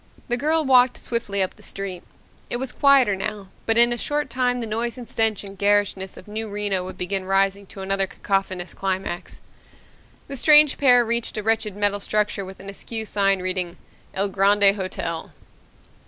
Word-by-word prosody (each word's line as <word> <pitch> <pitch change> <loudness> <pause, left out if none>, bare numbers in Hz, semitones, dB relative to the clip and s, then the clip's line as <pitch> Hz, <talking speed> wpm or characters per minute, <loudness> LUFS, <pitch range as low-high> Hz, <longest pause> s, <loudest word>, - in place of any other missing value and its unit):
The 240 - +1
girl 310 +4 +1
walked 255 -1 +5
swiftly 200 -4 -2
up 185 - -4
the - - -17
street. 195 -3 -6 0.5
It - - -2
was 260 0 -3
quieter 275 -7 +4
now, 200 0 -5 0.2
but 225 0 +2
in 240 0 +6
a 240 - -5
short 295 +2 -2
time 250 -1 0
the 235 - -3
noise 230 +3 -2
and 245 -2 -8
stench 220 -3 +1
and 195 0 -9
garishness 200 -1 0
of 185 - -13
New 215 +1 -5
Reno 200 -2 -1
would 185 - -8
begin 190 +1 -2
rising 195 +1 +1
to 195 - -10
another 195 0 0
cacophonous 190 -2 -2
climax. 190 -2 -4 0.9
The 275 - -6
strange 300 +1 +6
pair 245 -3 +6
reached 235 0 -2
a 215 - -3
wretched 220 -2 0
metal 205 0 +1
structure 210 0 -1
with 190 0 -10
an 195 - -11
askew 220 +3 -4
sign 195 -2 +1
reading, 185 -1 -2 0.4
"El 200 +1 0
Grande 200 +1 +4
Hotel." 185 -4 -4
205 Hz, 180 wpm, -23 LUFS, 195-235 Hz, 0.9 s, in